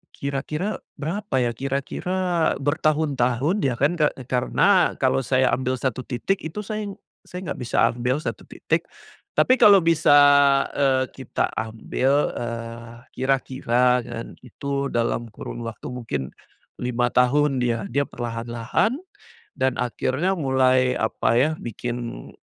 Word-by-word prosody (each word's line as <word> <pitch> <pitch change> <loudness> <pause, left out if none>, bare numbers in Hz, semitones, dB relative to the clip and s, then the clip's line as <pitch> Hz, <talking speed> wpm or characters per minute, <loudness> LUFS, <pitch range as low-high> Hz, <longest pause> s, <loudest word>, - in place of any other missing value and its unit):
kira-kira, 150 +8 -3 0.2
berapa 185 +5 -3
ya? 120 -1 +1
Kira-kira, 165 +6 -1
bertahun-tahun 145 - +1
ya 130 -3 +1
kan 145 +5 +3
ke 155 -3 +3 0.2
karena 150 +9 +2
kalau 130 0 +2
saya 130 0 +2
ambil 130 0 0
1 130 0 -2
titik 130 +12 -2
itu 160 +6 -5
saya, 215 0 -4 0.3
saya 180 +1 -8
nggak - - -5
bisa 120 - -3 0.2
ambil 125 +2 -1
1 - - -5
titik - - -2 0.5
tapi 255 - +5
kalau 205 -5 +7
bisa, 165 -3 +3 0.6
eee, 135 -2 +2
kita 130 -3 -2
ambil, 125 +6 0
eee, 115 0 -6 0.2
kira-kira 125 -2 +1
kan 115 0 -7
itu 140 +3 -3
dalam 115 -1 -1
kurun 120 +2 -7
waktu 115 -2 -7
mungkin 120 - -4 0.6
5 125 0 0
tahun 135 +2 +3
dia 115 -2 -1
dia 140 +4 0
perlahan-lahan, 120 - -2 0.6
dan 130 -1 +1
akhirnya 130 +8 0
mulai 130 -3 +3
apa 110 0 0
ya, 130 +6 +3
bikin 120 +1 -6
130 Hz, 125 wpm, -23 LUFS, 120-150 Hz, 0.6 s, kalau